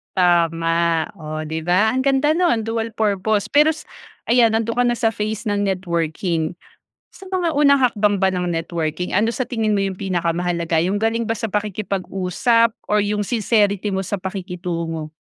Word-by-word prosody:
Tama, 165 Hz, -2 st, +2 dB
oh, 155 Hz, -3 st, -6 dB
'di 160 Hz, +1 st, -4 dB
ba, 180 Hz, +6 st, +3 dB
ang 260 Hz, -, 0 dB
ganda 275 Hz, +3 st, +2 dB
nun 280 Hz, -11 st, +1 dB
dual 225 Hz, 0 st, -2 dB
purpose. 210 Hz, -1 st, 0 dB
Pero 300 Hz, +2 st, +4 dB
s 315 Hz, -, -10 dB, 0.4 s
ayan 235 Hz, -1 st, +4 dB
nandun 225 Hz, +1 st, -1 dB
ka 245 Hz, -, +2 dB
na 245 Hz, -, +2 dB
sa 225 Hz, -, +1 dB
phase 220 Hz, 0 st, -3 dB
ng 205 Hz, -1 st, 0 dB
networking 170 Hz, -3 st, -1 dB, 0.6 s
sa -, -, -13 dB
mga 345 Hz, -5 st, 0 dB
unang 280 Hz, -1 st, +5 dB
hakbang 210 Hz, -5 st, +2 dB
ba 190 Hz, -, +4 dB
ng 180 Hz, -2 st, -2 dB
networking, 165 Hz, +1 st, -3 dB
ano 225 Hz, +4 st, +2 dB
sa -, -, -3 dB
tingin 225 Hz, -3 st, -1 dB
mo 205 Hz, -, +1 dB
yung 195 Hz, -1 st, -2 dB
pinakamahalaga 175 Hz, -2 st, -1 dB
yung 200 Hz, +3 st, 0 dB
galing 225 Hz, +1 st, +1 dB
ba 225 Hz, -, -2 dB
sa 225 Hz, 0 st, -3 dB
pakikipag-usap 210 Hz, +2 st, 0 dB, 0.2 s
or 210 Hz, -, +4 dB
yung 205 Hz, 0 st, -1 dB
sincerity 210 Hz, -2 st, +1 dB
mo 190 Hz, -1 st, -1 dB
sa 200 Hz, +2 st, -3 dB
pakikitungo? 175 Hz, -4 st, -4 dB
200 Hz, 170 wpm, -20 LUFS, 175-225 Hz, 0.6 s, unang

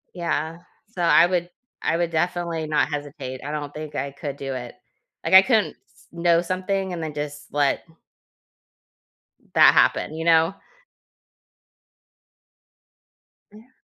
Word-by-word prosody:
Yeah. 165 Hz, -1 st, -2 dB, 0.3 s
So, 185 Hz, -6 st, -6 dB
I 170 Hz, 0 st, +6 dB
would 175 Hz, -1 st, -1 dB, 0.3 s
I 165 Hz, -, 0 dB
would 170 Hz, -1 st, -1 dB
definitely 170 Hz, -1 st, -1 dB
not 150 Hz, 0 st, +1 dB
hesitate. 145 Hz, -3 st, -6 dB
I 145 Hz, -, -4 dB
don't 145 Hz, -1 st, -5 dB
think 155 Hz, -1 st, -8 dB
I 140 Hz, +1 st, -3 dB
could 140 Hz, 0 st, -6 dB
do 135 Hz, -1 st, -5 dB
it, 125 Hz, -2 st, -7 dB, 0.5 s
like, -, -, -2 dB
I 190 Hz, -, +11 dB
couldn't 220 Hz, -2 st, +1 dB
s -, -, -25 dB
know 170 Hz, 0 st, +2 dB
something 185 Hz, +1 st, -2 dB
and 170 Hz, -, -5 dB
then, 155 Hz, -2 st, -4 dB
just, 145 Hz, 0 st, -6 dB
let 145 Hz, -1 st, +1 dB, 1.7 s
that -, -, +7 dB
happen, -, -, +2 dB
you 160 Hz, +1 st, -4 dB
know? 165 Hz, +1 st, +4 dB, 3.0 s
Yeah. 225 Hz, +5 st, -17 dB
165 Hz, 135 wpm, -23 LUFS, 145-175 Hz, 3.0 s, I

